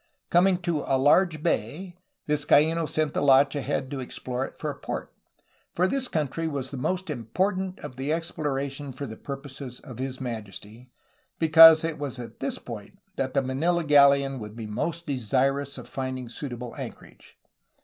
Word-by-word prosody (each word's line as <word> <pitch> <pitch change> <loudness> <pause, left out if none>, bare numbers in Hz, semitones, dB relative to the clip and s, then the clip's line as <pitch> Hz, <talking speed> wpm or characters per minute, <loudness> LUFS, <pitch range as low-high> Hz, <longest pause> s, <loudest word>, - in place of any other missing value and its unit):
Coming 180 +1 +5
to 170 -4 0
''a 135 - +3
large 155 +3 +3
bay," 170 - -2 0.3
Vizcaino 150 +2 +3
sent 155 -2 0
the - - 0
launch 135 0 +5
ahead 135 -1 -2
to 140 - -3
explore 125 0 -4
it - - -16
for - - -3
a - - -9
port, - - -5 0.6
"for 180 +2 +3
this 260 +5 -1
country 160 - -2
was 140 -4 -3
the 140 - -5
most 180 +6 -2
important 185 - -1
of 125 - -8
the 135 +3 -2
exploration 145 -4 -3
for 140 +3 -5
the 110 - -7
purposes 135 -2 -7
of 125 -5 -11
His 130 0 -4
Majesty,'' 115 -1 -7 0.5
because 160 0 +9
it 165 -2 -3
was 140 -3 -4
at 120 -2 -9
this - - -2
point - - -9 0.2
that 130 0 -2
the 140 - +3
Manila 165 +7 0
galleon 140 -2 +5
would 105 -1 -8
be 115 -1 -6
most 165 +11 -3
desirous 135 +2 0
of - - -9
finding 130 -2 -4
suitable 125 -2 -6
anchorage. - - -10
140 Hz, 170 wpm, -26 LUFS, 130-160 Hz, 0.6 s, because